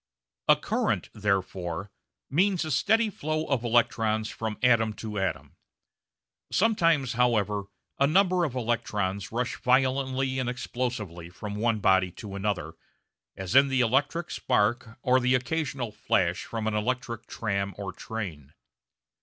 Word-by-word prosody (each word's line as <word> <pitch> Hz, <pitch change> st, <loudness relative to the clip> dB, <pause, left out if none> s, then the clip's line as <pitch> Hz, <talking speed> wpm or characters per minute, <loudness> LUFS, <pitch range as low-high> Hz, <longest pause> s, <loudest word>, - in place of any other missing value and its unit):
A -, -, +8 dB
current, -, -, -1 dB
therefore, 95 Hz, -3 st, -2 dB, 0.4 s
means 180 Hz, +4 st, +2 dB
a 155 Hz, -, -3 dB
steady 220 Hz, -, +3 dB
flow 155 Hz, -2 st, -2 dB
of 135 Hz, -5 st, 0 dB
the 120 Hz, -, -3 dB
electrons 110 Hz, -2 st, +2 dB
from 110 Hz, -1 st, -4 dB
atom 115 Hz, -3 st, +4 dB
to 105 Hz, -1 st, -5 dB
atom. 95 Hz, -2 st, -3 dB, 0.9 s
Sometimes, 165 Hz, -, +3 dB
however, 105 Hz, -4 st, +1 dB, 0.3 s
a 140 Hz, -, +5 dB
number 180 Hz, +2 st, +3 dB
of 140 Hz, -6 st, -2 dB
electrons 105 Hz, -5 st, -1 dB
rush 120 Hz, +2 st, -2 dB
violently 130 Hz, +1 st, +2 dB
and 125 Hz, -1 st, -1 dB
explosively 120 Hz, -9 st, -4 dB
from 100 Hz, +3 st, -7 dB
one 110 Hz, 0 st, 0 dB
body 95 Hz, -1 st, +4 dB
to 105 Hz, -3 st, -9 dB
another, 100 Hz, -6 st, -2 dB, 0.6 s
as 95 Hz, +2 st, -4 dB
in 135 Hz, +2 st, +7 dB
the 130 Hz, -1 st, +2 dB
electric 145 Hz, +8 st, +1 dB
spark 115 Hz, +2 st, 0 dB
or 130 Hz, -1 st, +4 dB
the 125 Hz, 0 st, +3 dB
occasional 130 Hz, -2 st, -2 dB
flash 90 Hz, -3 st, 0 dB
from 115 Hz, -2 st, -4 dB
an 110 Hz, -, 0 dB
electric 115 Hz, +1 st, -2 dB
tram 100 Hz, -3 st, -2 dB
or 100 Hz, -2 st, -5 dB
train. 85 Hz, -11 st, -6 dB
115 Hz, 135 wpm, -27 LUFS, 105-130 Hz, 0.9 s, A